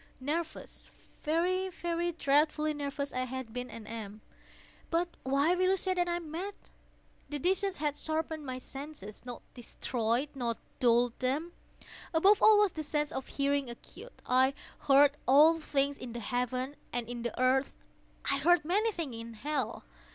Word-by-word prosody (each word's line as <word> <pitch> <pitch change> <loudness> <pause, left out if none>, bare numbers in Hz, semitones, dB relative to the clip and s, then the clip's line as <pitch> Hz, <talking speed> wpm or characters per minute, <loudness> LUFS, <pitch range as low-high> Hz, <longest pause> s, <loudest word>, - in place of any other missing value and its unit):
—nervous—very, 335 +4 -2
very 345 -1 -2
dreadfully 305 0 +2
nervous 285 -1 -4
I 255 0 0
had 255 -3 -6
been 250 0 -4
and 220 -2 -9
am; 215 -2 -7 0.7
but 340 +1 +1
why 280 +5 +2
will 370 +1 +2
you 385 - +3
say 375 0 0
that 355 -1 +1
I 345 - 0
am 335 -3 -6
mad? 385 +5 -4 0.7
The 295 - -2
disease 380 +5 +1
had 295 -1 -1
sharpened 315 0 -2
my 255 -2 -4
senses—not 255 -4 -8
destroyed—not 240 +1 -2 0.2
dulled 240 -1 +3
them. 280 +7 -1 0.6
Above 390 +5 +5
all 435 -1 +8
was 415 -2 +4
the 315 - -5
sense 295 0 -1
of 265 - -4
hearing 280 -2 0
acute. 240 - -12
I 260 +2 +3 0.2
heard 285 +1 +5
all 305 +5 +7
things 280 -2 0
in 240 -2 -7
the 240 - -4
heaven 250 +4 -2
and 240 -1 -2
in 240 0 -5
the 235 +1 -4
earth. 260 +2 +2 0.5
I 275 - +2
heard 345 +2 +4
many 415 +7 +2
things 320 - -4
in 230 0 -8
hell. 275 +1 -2
285 Hz, 155 wpm, -31 LUFS, 250-330 Hz, 0.7 s, all